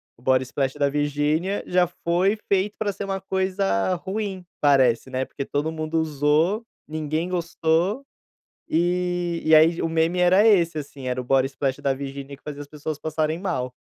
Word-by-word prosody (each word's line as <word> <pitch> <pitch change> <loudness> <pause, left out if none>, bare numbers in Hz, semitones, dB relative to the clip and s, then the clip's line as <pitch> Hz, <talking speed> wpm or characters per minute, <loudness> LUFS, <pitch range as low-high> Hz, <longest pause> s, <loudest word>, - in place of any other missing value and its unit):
O 120 - -24
Body 130 0 +3
Splash 135 +1 -2
da 145 -1 +1
Virgínia, 150 +6 0
já 180 0 +2
foi 180 +4 0
feito 200 +1 +1
pra 210 -2 -1
ser 200 - -5
uma 195 0 -2
coisa 190 - 0
ruim, 190 0 -4 0.2
parece, 130 -4 +3
né, 130 0 -2
porque 140 - -6
todo 145 +3 -2
mundo 160 0 -2
usou, 155 +7 +1 0.2
ninguém 155 +2 -2
gostou, 175 +6 0 0.6
e 175 0 0
e 160 - +3
aí 165 +2 +5
o 165 - 0
meme 165 +2 +1
era 185 +4 +5
esse, 170 -7 +4
assim, 140 -2 -7
o 135 +2 0
da 135 - +1
Virgínia 140 +1 -7
que - - -35
fazia 145 -1 -6
as 145 - -9
pessoas 150 0 -5
passarem 155 +1 -1
mal. 165 -10 -3
160 Hz, 165 wpm, -24 LUFS, 140-180 Hz, 0.6 s, aí